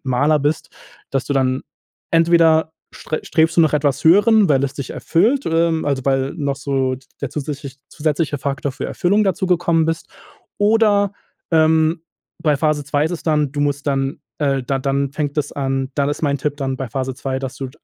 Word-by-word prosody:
Maler 145 +4 +2
bist, 145 +1 -1 0.4
dass 135 -2 -1
du 140 - -1
dann 130 -1 +1 0.5
entweder 165 -1 +4 0.2
st-strebst 160 +1 0
du - - +8
nach 155 -2 +3
etwas 145 -1 0
Höherem, 205 +3 +5
weil 140 -2 +3
es 140 - -2
dich 140 -3 -6
erfüllt, 235 +12 +1
ähm, 165 0 +1
also, 140 -2 -1
weil 135 0 +1
noch 140 -2 -2
so 135 -2 -1 0.2
der 140 - -2
zusätzlich 140 -2 -5
zusätzliche 150 -1 -1
Faktor 140 0 -3
für - - -5
Erfüllung 200 +4 +1
dazugekommen 175 -3 +1
bist 165 0 -3 0.5
oder, 205 -1 +3 0.4
ähm, 160 0 +3 0.4
bei 150 -3 +3
Phase 150 0 0
2 145 +1 0
ist 160 - -1
es 170 - -5
dann, 150 -4 +1
du 145 - -3
musst 145 0 -1
dann 135 +3 -1 0.2
äh, 140 -3 0
d 135 +2 -1
dann 140 +1 -1
fängt 145 -1 -3
das 150 - -1
an. 135 -1 -2
Dann 140 -1 +1
ist 145 - -3
mein 140 -1 +1
Tipp 145 +1 -2
dann 135 -2 -2
bei 130 -1 -5
Phase 130 +2 -3
2, 130 0 -3
dass 135 -1 -5
du 135 -2 -5
145 Hz, 185 wpm, -19 LUFS, 135-165 Hz, 0.5 s, du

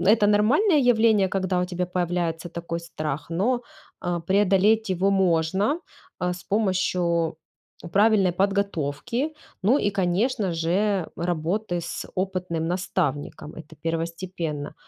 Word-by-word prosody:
это 210 +1 +4
нормальное 270 - +4
явление, 220 -6 +4
когда 185 -1 0
у - - +1
тебя 180 0 -2
появляется 175 -2 -2
такой 170 0 -4
страх, 155 -2 -5
но, 240 +9 +1 0.4
э, 175 -1 -1
преодолеть 205 +2 +3
его 190 +2 +2
можно, 190 - +2 0.4
э, 180 0 0
с 180 - -11
помощью 180 -5 +1 0.6
правильной 200 -3 +4
подготовки, 200 - -1 0.3
ну, 245 +9 +4
и 205 - +1
конечно 195 +2 0
же, 180 +3 0
работы 175 +3 -1
с - - -5
опытным 185 -3 -2
наставником- 170 -5 -2
это 160 -1 -12
первостепенно. 165 -2 -3
185 Hz, 115 wpm, -25 LUFS, 170-205 Hz, 0.6 s, это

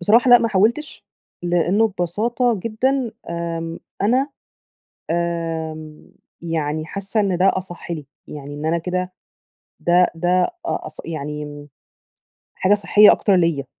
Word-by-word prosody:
بصراحة 230 +7 +4
لأ 245 - +10
ما 230 - 0
حاولتِش، 225 +9 0 0.4
لأنه 175 +5 +2
ببساطة 215 +5 0
جدًا 245 +2 0 0.2
آمم، 165 -1 -4 0.2
أنا 255 +7 +2 0.8
آمم، 165 -2 -3 0.3
يعني 155 -2 -2
حاسَّة 200 +3 -2
إن 195 -3 +1
ده 190 +2 +4
أصَح 175 -2 -7
لي، 155 -5 -4 0.2
يعني 145 -1 -8
إن 150 +2 -5
أنا 165 +1 +1
كده 180 +2 -3 0.7
ده 175 +1 +4
ده 170 +2 -2 0.2
أ - - -3
أص - - -4
يعني 150 -1 -6 0.9
حاجة 190 +2 +3
صحيَّة 205 +1 +6
أكتر 200 -3 +3
ليّا. 165 -6 +1
175 Hz, 125 wpm, -21 LUFS, 165-210 Hz, 0.9 s, لأ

